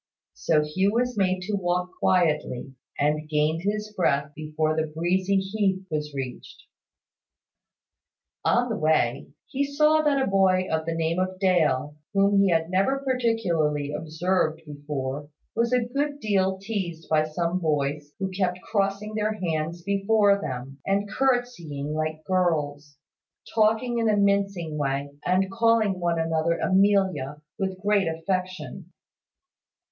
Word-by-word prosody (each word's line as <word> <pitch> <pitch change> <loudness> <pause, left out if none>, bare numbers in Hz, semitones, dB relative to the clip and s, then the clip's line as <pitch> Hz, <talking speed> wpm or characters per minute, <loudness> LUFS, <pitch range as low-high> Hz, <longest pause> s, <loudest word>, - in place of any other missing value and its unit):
So 65 - +2
Hugh 190 +7 0
was 245 +1 0
made 185 -2 +1
to 210 +3 -4
walk 180 -2 0
quietly, 150 -7 +1 0.2
and 150 +1 0
gained 155 +2 +1
his 210 +2 -2
breath 145 -6 +1
before 155 0 -1
the 160 0 0
breezy 180 +5 0
heath 190 -1 0
was 150 -1 -2
reached. 130 -2 -7 1.8
On 245 +1 +2
the 220 - -1
way, 150 -5 +1 0.2
he 275 +1 -1
saw 300 +2 +3
that 290 -2 +2
a 265 - +2
boy 190 -2 +3
of 160 0 -1
the 165 - -1
name 165 +1 0
of 185 0 -1
Dale, 155 -6 +1 0.2
whom 200 0 +4
he 200 - +4
had 165 0 +1
never 195 +9 +2
particularly 175 - 0
observed 160 +1 -1
before, 145 -1 -5 0.3
was 235 +1 +1
a 250 -2 +2
good 285 +4 -2
deal 190 -5 +1
teased 190 -6 -4
by 155 -1 +3
some 170 +3 -1
boys 145 -2 -1
who 190 -1 -3
kept 185 -1 -1
crossing 200 +1 -1
their 215 0 0
hands 165 0 -2
before 200 +1 +3
them, 130 0 -6
and 200 +1 0
curtseying 240 - -1
like 155 0 -3
girls, 150 -6 -1 0.6
talking 225 +2 +2
in 225 -1 +2
a 210 - +3
mincing 200 -6 +1
way, 140 0 -1 0.2
and 190 +1 +2
calling 230 -3 +2
one 170 -1 0
another 165 0 +1
Amelia, 190 -8 +2 0.2
with 190 -1 -2
great 200 -2 +2
affectation. 185 +2 -3
185 Hz, 140 wpm, -25 LUFS, 155-200 Hz, 1.8 s, whom